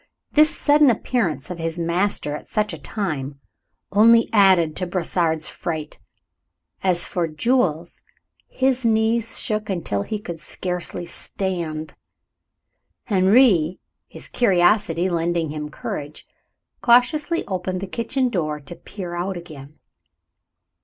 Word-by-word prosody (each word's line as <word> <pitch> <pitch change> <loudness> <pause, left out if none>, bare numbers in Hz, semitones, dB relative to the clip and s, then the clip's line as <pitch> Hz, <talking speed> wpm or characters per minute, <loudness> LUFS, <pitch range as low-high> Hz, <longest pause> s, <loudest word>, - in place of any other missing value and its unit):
This 305 +1 +5
sudden 295 -1 +4
appearance 195 - -1
of 175 - -6
his 165 0 -3
master 170 -2 0
at - - -10
such 210 -1 -1
a - - -5
time 145 -10 -4 0.5
only 230 +3 +5
added 185 -7 +4
to 180 - -2
Brossard's 170 -3 0
fright. 160 -3 -5 0.8
As 180 -2 +3
for 175 -2 -2
Jules, 170 - 0 0.5
his 260 -1 0
knees 225 0 +1
shook 215 0 -1
until 165 - -2
he 215 - -3
could 170 -5 -7
scarcely 180 +1 -4
stand. 170 -3 -4 1.2
Henri, 190 -4 +4 0.3
his - - -10
curiosity 185 -4 +2
lending 170 -2 -1
him 150 0 -5
courage, 150 0 -7 0.5
cautiously 295 +7 +3
opened 185 -1 -3
the 195 - -4
kitchen 245 +6 -1
door 155 -8 -2
to 145 +4 -11
peer 180 -2 -8
out 180 +2 -3
again. 155 -4 -11
180 Hz, 120 wpm, -22 LUFS, 165-220 Hz, 1.2 s, This